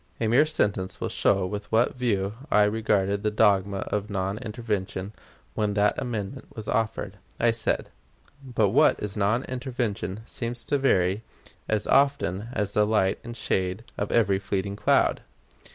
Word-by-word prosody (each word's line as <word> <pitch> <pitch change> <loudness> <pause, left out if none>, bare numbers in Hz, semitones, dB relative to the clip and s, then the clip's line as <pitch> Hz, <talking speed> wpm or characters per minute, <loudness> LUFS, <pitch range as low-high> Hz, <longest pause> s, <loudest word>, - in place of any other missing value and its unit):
A 115 - +1
mere 130 +7 +4
sentence 100 -11 -1
will - - -2
show 95 -2 +2
with 105 +2 -5
what 115 +2 +3
view 105 -6 0 0.2
I 105 - +5
regarded 105 -2 +1
the 105 - +1
dogma 100 -2 +2
of 105 +1 -1
non 100 +1 -2
intervention 105 -4 -4 0.4
when 105 -1 -1
that 105 0 +3
amendment 120 +1 -4
was 110 -3 -7
offered. 110 -4 -1 0.2
I 120 0 +4
said: 115 0 -1 0.5
"But 120 -6 +1
what - - +5
is 105 -2 -3
non 110 +5 +1
intervention 120 -7 -3
seems 120 0 -4
to 145 - 0
vary 95 -6 +2 0.5
as 110 -1 +1
often 135 -8 +2
as 105 -4 -2
the 105 0 +3
light 100 -3 +2
and 120 0 -7
shade 95 0 -1
of 100 - -3
every 100 -4 +3
fleeting 100 0 -2
cloud. - - +2
105 Hz, 155 wpm, -26 LUFS, 100-115 Hz, 0.5 s, I